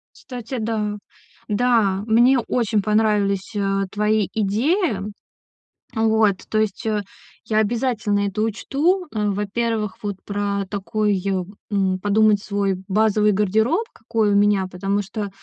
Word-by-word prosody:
Кстати, 250 0 -7
да. 215 -2 -2 0.5
Да, 210 -3 +2
мне 240 +4 +5
очень 230 -3 0
понравились, 210 -1 +1
э, 195 -1 0
твои 210 -1 +1
идеи. 225 - +1 1.0
Э, 220 - 0
вот, 220 -2 +3
то 215 - +1
есть, 215 -1 -2
э, 215 -2 0 0.4
я 215 - 0
обязательно 220 -2 0
это 200 +2 -3
учту. 295 - 0
Э, 210 -1 0
во-первых, 210 +1 -2
вот 205 -1 -3
про 200 -1 -2
такой, 205 0 -1 0.5
м, 190 -2 +1
подумать 210 +1 +3
свой 200 -2 -1
базовый 210 +1 +3
гардероб, 220 - +1
какой 225 -2 0
у - - +2
меня, 205 -1 +3
потому 195 +3 -1
что 205 +1 -5
210 Hz, 130 wpm, -22 LUFS, 200-225 Hz, 1.0 s, мне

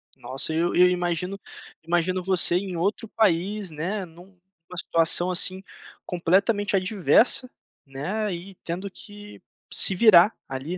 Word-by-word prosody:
Nossa, 135 +4 -4
e - - -1
eu 170 +1 0
e 180 - +4
eu 180 - +7
imagino 180 +2 -2 0.4
imagino 175 +2 0
você 185 -2 +2
em 185 -1 -2
outro 205 +5 -1
país, 200 -1 0
né, 185 +6 -4
num 175 +3 -17 0.3
uma 180 - -9
situação 170 +2 +1
assim, 185 +2 -2 0.4
completamente 200 +4 +1
adversa, 210 +6 +2 0.4
né, 185 +10 -3
e 185 +3 -8
tendo 185 +3 -5
que 205 +1 -9 0.3
se 190 - +4
virar 200 -1 +6
ali, 135 +7 -5
185 Hz, 140 wpm, -24 LUFS, 170-200 Hz, 0.4 s, eu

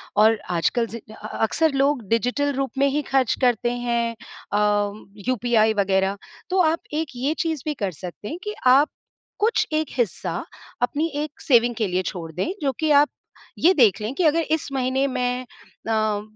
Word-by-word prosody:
और 220 +1 +5 0.2
आजकल 230 +9 +1
ज़ि 230 +1 -7
अ - - -20
अ - - -11
अ, - - -7
अक्सर 320 +8 +2
लोग 275 -1 +2
डिजिटल 250 +5 +1
रूप 270 -2 -2
में 275 +1 +4
ही 290 +2 0
खर्च 265 -3 +3
करते 240 -1 +2
हैं 235 -1 -1 0.4
अ, 205 0 +2 0.4
यूपीआई 230 -3 +3
वगैरह, 195 -1 +1 0.3
तो 375 - +1
आप 330 - -2
एक 315 +1 -1
ये 265 +5 0
चीज़ 320 -5 -1
भी 305 - 0
कर 200 -8 -3
सकते 180 +5 -9
हैं 325 - -4
कि 420 - -4
आप 275 +4 +6 0.5
कुछ 440 +2 +2
एक 310 0 +1
हिस्सा, 230 -7 -1 0.4
अपनी 290 +6 +1 0.2
एक 300 -1 -9
सेविंग 240 -4 +3
के 215 -2 0
लिए 180 0 0
छोड़ 165 -4 -5
दें, 185 - -2
जो 275 - +1
कि 310 -1 +1
आप 290 +1 +6 0.5
ये 360 +4 +5
देख 230 - +4
लें 215 +4 -3
कि, 355 - -1
"अगर 325 +1 +4
इस 315 -2 0
महीने 265 +1 +1
मैं 250 -1 -1 0.4
अ, 215 -2 +1
245 Hz, 185 wpm, -23 LUFS, 215-290 Hz, 0.5 s, आप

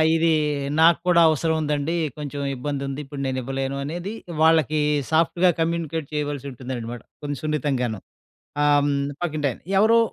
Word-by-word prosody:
ఇదీ 165 0 +3 0.5
నాకు 165 +1 +6
కూడా 175 -1 +5
అవసరం 160 +1 +1
ఉందండీ, 150 +2 -1 0.2
కొంచుం 145 -1 -5
ఇబ్బందుంది. 140 +1 -3
ఇప్పుడు 140 0 -7
నేనివ్వలేను 135 +1 -2
అనేది 175 +8 -4 0.3
వాళ్ళకి 160 -1 +4 0.3
సాఫ్ట్‌గా 170 +3 +3
కమ్యూనికేట్ 165 -2 -1
చేయవలసుంటుందనమాట, 130 -5 -4 0.2
కొంచుం 145 -2 -4
సున్నితంగాను, 135 -8 -1 0.6
ఆహ్, 145 0 +4
హ్మ్, 145 - +1 0.3
పక్కింటాయన. 150 -6 -1 0.2
ఎవరో 225 +3 +5
145 Hz, 120 wpm, -23 LUFS, 135-160 Hz, 0.6 s, నాకు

